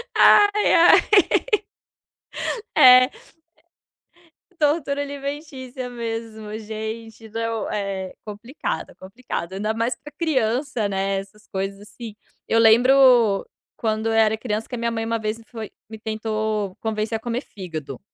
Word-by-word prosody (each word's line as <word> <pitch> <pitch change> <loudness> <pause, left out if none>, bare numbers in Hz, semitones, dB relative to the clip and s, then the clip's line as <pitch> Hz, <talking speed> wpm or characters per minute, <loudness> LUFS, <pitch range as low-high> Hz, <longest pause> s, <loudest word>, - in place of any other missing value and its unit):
Ai, 415 0 +5
ai. 345 +1 +7 1.8
É 255 -3 +9
é, - - -14 1.5
tortura 290 -2 +1
alimentícia 280 -3 -6
mesmo, 225 -2 -6
gente 220 +1 -7
não, 225 0 -3
é 195 -2 -3
complicado, 225 +7 -5
é - - -17
complicado. 190 -3 -6
Ainda 210 +3 -2
mais 230 +2 -1
pra 295 - -11
criança, 260 -6 0
né, 195 0 -1
essas 200 +2 -11
coisas 195 +1 -4
assim. 210 +1 -10 0.3
Eu 225 - +3
lembro 240 -2 +5 0.3
quando 220 0 -1
eu 225 - +1
era 220 -1 +3
criança, 220 -1 -3
que 250 - -6
a - - -3
minha 235 0 -1
mãe 225 -1 -3
uma 230 0 -1
vez 215 +1 -3
foi 225 -3 -7 0.2
me 220 -1 -9
tentou 215 -2 -2
convencer 220 0 -2
a - - -7
comer 240 +2 -3
fígado. 160 - -8
225 Hz, 130 wpm, -22 LUFS, 215-250 Hz, 1.8 s, É